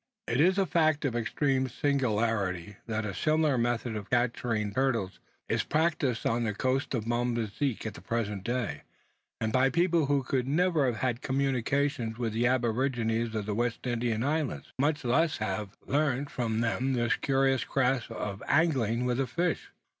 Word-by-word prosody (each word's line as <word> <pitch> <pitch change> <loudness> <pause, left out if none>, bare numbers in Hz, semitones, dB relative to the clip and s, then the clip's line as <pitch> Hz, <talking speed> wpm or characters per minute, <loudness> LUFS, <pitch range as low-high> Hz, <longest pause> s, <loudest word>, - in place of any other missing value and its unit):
It 120 +4 +2
is 185 +4 +4
a 195 - +3
fact 155 -4 +2
of 125 -4 -1
extreme 130 +3 0
singularity, 110 -9 0
that 110 -1 -2
a 100 - -3
similar 155 - +2
method 120 -1 0
of 105 -2 -6
capturing 120 -3 0
turtles 115 -7 0 0.3
is - - +1
practised 150 -6 0
on 120 +1 +1
the 105 -3 -1
coast 130 +4 0
of 110 -3 -2
Mozambique 120 +1 -1
at 110 - -3
the - - -11
present 105 -2 -2
day, 115 - -2 0.6
and 110 -1 -1
by 130 +1 +4
a - - -1
people 170 -1 +2
who 140 -1 +2 0.2
never 155 +3 +2
could 125 - +1
have 110 - -7
had 125 -3 +2
any - - -24
communication 135 -2 0
with 115 -3 -2
the 120 +2 +2
aborigines 120 -2 0
of 105 -2 -2
the 105 - -2
West 120 +3 -1
Indian 120 -2 0
Islands, 145 - -2
much 145 0 +1
less 155 +6 +2
have 105 -1 -3
learnt 140 -1 0
from 115 -2 -1
them 125 +3 0
this 120 +1 +2
curious 135 -2 +2
craft 130 -3 0
of 100 -1 -5
angling 130 -7 +2
with 125 0 0
a 135 - +1
fish! 170 +6 -1
125 Hz, 175 wpm, -29 LUFS, 115-140 Hz, 0.6 s, is